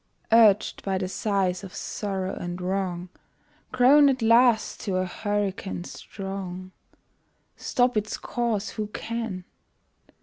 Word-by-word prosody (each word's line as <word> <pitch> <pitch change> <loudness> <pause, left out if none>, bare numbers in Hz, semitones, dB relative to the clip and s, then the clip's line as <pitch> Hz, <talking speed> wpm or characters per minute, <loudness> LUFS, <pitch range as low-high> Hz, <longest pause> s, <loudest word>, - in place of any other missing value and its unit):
Urged 220 -3 +5
by 195 -1 -1
the 185 -1 -2
sighs 190 -2 -1
of 190 -1 -9
sorrow 190 -2 -3
and 175 +1 -5
wrong, 180 -1 -2 0.6
Grown 280 +3 +6
at 260 -3 0
last 230 0 +4
to 195 -4 -3
a 185 0 +1
hurricane 200 -1 -3
strong, 185 -1 -7 0.8
Stop 245 -1 +1
its 215 0 -1
course 230 -4 -2
who 215 -2 -4
can! 225 -4 -5
200 Hz, 115 wpm, -26 LUFS, 185-225 Hz, 0.8 s, Grown